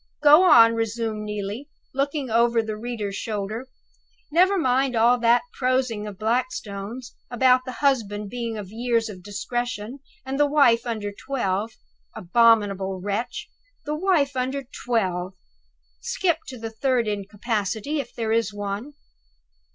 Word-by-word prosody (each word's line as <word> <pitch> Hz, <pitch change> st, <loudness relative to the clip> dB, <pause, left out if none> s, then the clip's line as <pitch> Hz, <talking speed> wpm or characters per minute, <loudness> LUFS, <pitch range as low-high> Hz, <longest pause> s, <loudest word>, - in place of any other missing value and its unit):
Go 300 Hz, +3 st, +8 dB
on," 230 Hz, -3 st, +8 dB
resumed 225 Hz, -1 st, -2 dB
Neelie, 210 Hz, +7 st, -5 dB, 0.2 s
looking 275 Hz, -1 st, -1 dB
over 235 Hz, 0 st, +3 dB
the 215 Hz, -1 st, -4 dB
reader's 215 Hz, -3 st, -4 dB
shoulder. 215 Hz, +3 st, -4 dB, 0.6 s
"Never 370 Hz, +5 st, +4 dB
mind 260 Hz, -4 st, +1 dB
all 235 Hz, +2 st, +4 dB
that 235 Hz, +1 st, +4 dB
prosing 255 Hz, -5 st, 0 dB
of 205 Hz, -2 st, -8 dB
Blackstone's, 230 Hz, -, -3 dB
about 255 Hz, +1 st, +3 dB
the 255 Hz, -, -5 dB
husband 210 Hz, -6 st, +1 dB
being 235 Hz, -2 st, -4 dB
of 200 Hz, -2 st, -7 dB
years 230 Hz, 0 st, 0 dB
of 190 Hz, -3 st, -9 dB
discretion, 220 Hz, +4 st, -4 dB, 0.3 s
and 270 Hz, +1 st, -3 dB
the 290 Hz, -, +5 dB
wife 250 Hz, -5 st, +4 dB
under 215 Hz, -3 st, -3 dB
twelve. 215 Hz, -2 st, -2 dB, 0.4 s
Abominable 195 Hz, -2 st, +2 dB
wretch! 205 Hz, +6 st, -3 dB, 0.4 s
the 300 Hz, -, -2 dB
wife 305 Hz, -5 st, +1 dB
under 260 Hz, +2 st, -2 dB
twelve! 190 Hz, -8 st, -2 dB, 0.6 s
Skip 335 Hz, -, 0 dB
to 260 Hz, -, -7 dB
the 225 Hz, -1 st, -6 dB
third 240 Hz, 0 st, 0 dB
incapacity, 210 Hz, +5 st, -2 dB
if 275 Hz, -, -5 dB
there 225 Hz, -2 st, -3 dB
is 225 Hz, -2 st, +1 dB
one." 205 Hz, +7 st, -5 dB
230 Hz, 135 wpm, -24 LUFS, 210-260 Hz, 0.6 s, Go